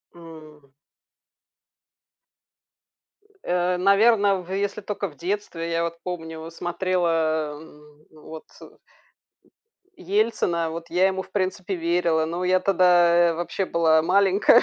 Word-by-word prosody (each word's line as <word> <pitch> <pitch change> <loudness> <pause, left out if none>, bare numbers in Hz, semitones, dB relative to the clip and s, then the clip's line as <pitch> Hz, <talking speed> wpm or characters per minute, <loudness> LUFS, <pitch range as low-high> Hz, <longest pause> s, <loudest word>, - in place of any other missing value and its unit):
М. 155 -4 -14 2.7
Э, 180 0 0
наверно, 200 0 +3
в 180 - -12
если 200 +1 -2
только 200 0 -4
в 145 - -18
детстве. 170 -1 -4
Я 165 0 0
вот 170 0 -4
помню 160 -2 -6
смотрела, 165 -4 -1
э, 150 -2 -16 0.3
вот, 155 0 -12 0.2
э, - - -10
м, - - -19 1.2
Ельцина, 185 - -1
вот 165 +1 -8
я 180 +2 +3
ему 190 0 -1
в 190 - -19
принципе 190 0 -2
верила. 170 -1 0
Но 170 +3 -4
я 185 +1 +3
тогда 175 -2 +4
вообще 175 +3 -3
была 160 -3 +2
маленькая, 195 +6 +4
175 Hz, 120 wpm, -23 LUFS, 165-190 Hz, 2.7 s, тогда